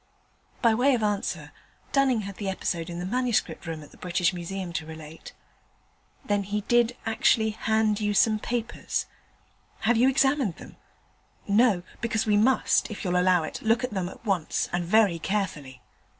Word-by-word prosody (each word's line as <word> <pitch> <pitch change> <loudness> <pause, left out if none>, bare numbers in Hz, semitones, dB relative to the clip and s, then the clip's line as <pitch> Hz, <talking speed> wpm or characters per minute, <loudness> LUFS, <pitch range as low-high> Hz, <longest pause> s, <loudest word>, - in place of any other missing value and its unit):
By 230 -2 +5
way 255 +4 +3
of 230 - -2
answer, 205 -1 -2 0.4
Dunning 265 -5 +3
had 200 -1 -7
the 200 -2 -3
episode 175 -3 -3
in 170 - -6
the 175 - -4
Manuscript 240 -3 -1
Room 160 -2 -5
at 145 - -15
the - - -17
British 180 0 0
Museum 180 0 -5
to 160 - -3
relate. 160 0 -10 0.9
'Then 205 -4 +1
he 205 +2 -3
did 240 +3 +2
actually 220 0 +2
hand 220 -1 +1
you 210 -1 0
some 215 +1 +4
papers; 235 +1 -3 0.8
have 235 +1 +3
you 250 +3 +5
examined 270 - +2
them? - - -13 0.7
No? 205 -3 +3 0.2
because 225 -2 0
we 210 -1 +3
must, 260 +4 +3
if 215 - -7
you'll 180 -1 0
allow 180 -1 +3
it, 155 - -6
look 225 +3 +2
at 250 - -2
them 185 -3 -2
at 210 - -14
once, 185 -6 0
and 175 0 0
very 195 -2 +3
carefully.' 150 -10 -3
205 Hz, 170 wpm, -26 LUFS, 180-230 Hz, 0.9 s, By